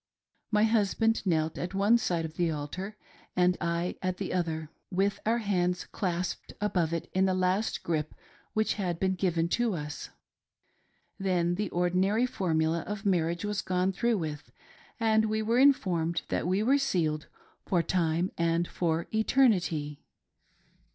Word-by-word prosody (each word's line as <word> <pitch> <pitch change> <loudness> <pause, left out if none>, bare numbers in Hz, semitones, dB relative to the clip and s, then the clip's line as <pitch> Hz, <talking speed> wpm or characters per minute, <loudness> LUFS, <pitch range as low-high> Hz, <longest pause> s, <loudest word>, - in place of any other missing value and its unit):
My 210 -1 +3
husband 225 0 +2
knelt 160 -2 +1
at 175 +2 -4
one 205 +4 +4
side 170 -7 -1
of 155 - -7
the 170 0 +1
altar 170 +7 -5 0.4
and 180 0 +3
I 170 +1 -1
at 185 -1 -1
the 195 - -3
other, 160 -3 -2 0.2
with 195 +2 0
our 230 +1 +3
hands 180 -5 0
clasped 180 -2 -3
above 180 -6 0
it 170 0 -3
in 190 +1 +3
the 190 -1 +1
last 185 +4 0
grip 155 -2 -2 0.4
which 220 0 +1
had 175 -3 -2
been 190 0 +1
given 175 -3 0
to 235 0 +1
us. 150 -2 -6 1.1
Then 180 -3 +1
the 200 +1 -2
ordinary 185 +6 +2
formula 165 -8 0
of 210 0 -5
marriage 170 -1 +1
was 210 -1 -1
gone 185 +1 0
through 235 +4 +1
with, 155 -4 -5 0.5
and 220 -1 +3
we 220 0 0
were 230 +3 +2
informed 175 - +3
that - - -1
we 190 +3 +1
were 275 +5 +4
sealed 160 - 0 0.4
for 175 -3 +2
time 170 +1 0
and 170 +1 +1
for 165 -1 -1
eternity. 185 - +2
180 Hz, 150 wpm, -29 LUFS, 170-210 Hz, 1.1 s, one